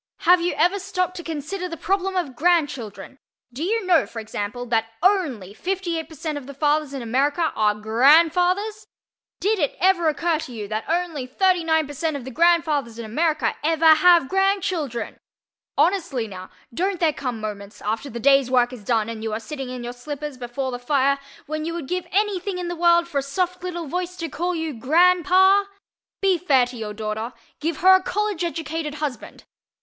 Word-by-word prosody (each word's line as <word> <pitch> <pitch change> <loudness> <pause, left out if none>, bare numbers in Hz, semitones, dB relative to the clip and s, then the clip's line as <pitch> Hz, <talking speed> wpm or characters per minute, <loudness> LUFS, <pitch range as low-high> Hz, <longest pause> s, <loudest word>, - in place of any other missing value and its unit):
Have 360 0 +5
you 350 -1 0
ever 355 +6 +2
stopped 365 -2 -2
to 345 - -6
consider 330 +4 -4
the 330 - -6
problem 385 +1 -1
of 315 -9 -2
grandchildren? 275 - -1 0.3
Do 275 +6 -4
you 435 +3 0
know, 355 -3 +3
for 230 - -7
example, 215 +2 -5
that 225 -2 0 0.2
ONLY 290 - +1
58% 325 - -3
of 275 -3 -8
the 280 - -9
fathers 295 0 +1
in 265 - -5
America 285 +8 +1
are 210 -1 +2
GRANDFATHERS? 335 - +3 0.5
Did 420 +1 +1
it 290 -4 0
ever 365 -2 +3
occur 325 +1 0
to 265 - -7
you 210 -3 -6
that 215 +1 -4
only 330 -6 -1
39% 320 -2 +1
of 270 -4 -6
the 265 - -6
grandfathers 310 -6 +2
in 230 - -6
America 300 +3 0
EVER 320 0 +5
HAVE 340 -2 +5
GRANDCHILDREN? 375 - -1 0.6
Honestly, 310 - +1
now, 185 -2 -9 0.2
don't 375 +5 -1
there 320 -3 +2
come 250 -5 -4
moments, 205 -1 -7
after 220 +6 -2
the 235 - -6
day's 275 0 +4
work 250 -1 +2
is 235 -5 -10
done 225 0 +1
and 230 -1 -6
you 220 0 -3
are 215 - -2
sitting 270 +3 -6
in 250 -1 -6
your 240 0 -5
slippers 290 +3 -6
before 255 +2 -4
the 245 - -5
fire, 275 +2 +1 0.3
when 310 +1 -4
you 335 +1 -3
would 325 -6 -5
give 360 +1 -3
any 410 -1 +1
thing 375 +1 -4
in 355 -1 -4
the 350 - -3
world 340 0 +4
for 290 -5 -1
a - - -1
soft 360 +6 -2
little 345 -2 -4
voice 360 +4 -3
to 330 -2 -5
call 350 +5 -2
you 320 -2 -3
GRANDPA? 360 - +4 0.6
_Be 375 -4 +3
fair 270 -8 +4
to 245 +1 -10
your 215 -2 -6
daughter 220 +3 -4 0.3
Give 320 +1 -2
her 375 +1 +8
a 375 - +5
College 415 -2 -2
educated 320 -2 -3
husband! 295 -6 -5
310 Hz, 185 wpm, -23 LUFS, 250-355 Hz, 0.6 s, her